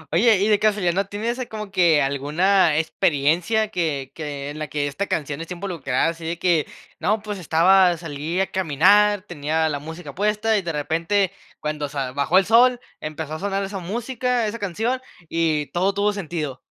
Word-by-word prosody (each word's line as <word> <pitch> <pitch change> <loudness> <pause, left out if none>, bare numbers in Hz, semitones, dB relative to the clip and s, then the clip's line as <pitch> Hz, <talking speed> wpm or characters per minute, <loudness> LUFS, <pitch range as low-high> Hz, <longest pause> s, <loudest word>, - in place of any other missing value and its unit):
Oye, 225 +4 +5
y 200 +2 +1
de 210 -1 +3
casualidad, 205 -5 +2
¿no 195 +1 0
tienes 225 +5 -3
así 255 - -4
como 215 -2 -7
que 170 -5 +4
alguna 155 +5 +2
experiencia 170 +6 +1
que 155 -9 -2
que 145 -2 -5
en 155 - -8
la 155 - -3
que 145 -1 -2
esta 145 +8 -3
canción 150 -1 -3
está 170 +2 -6
involucrada? 165 -6 -1
Así 165 0 -7
de 165 +1 -3
que, 170 -4 +1 0.3
no, 210 +5 0
pues 205 -3 -5
estaba, 175 +2 +4
salí 160 +2 -4
a 195 - +3
caminar, 190 +4 +3
tenía 160 -2 -1
la 145 -1 -2
música 160 +4 -9
puesta, 210 +2 +1
y 200 - +1
de 170 -2 -3
repente 165 +6 0 0.3
cuando 150 -1 -3
sa 135 -3 -3
bajó 145 +7 +2
el 190 - +5
sol, 245 +3 +5 0.2
empezó 155 0 -5
a 155 - -4
sonar 200 0 -1
esa 195 0 -5
música, 240 +5 -1
esa 215 +2 -4
canción, 225 +7 -2 0.3
y 160 -3 0
todo 190 +3 0
tuvo 205 +1 +1
sentido. 155 -8 -4
175 Hz, 185 wpm, -22 LUFS, 155-205 Hz, 0.3 s, Oye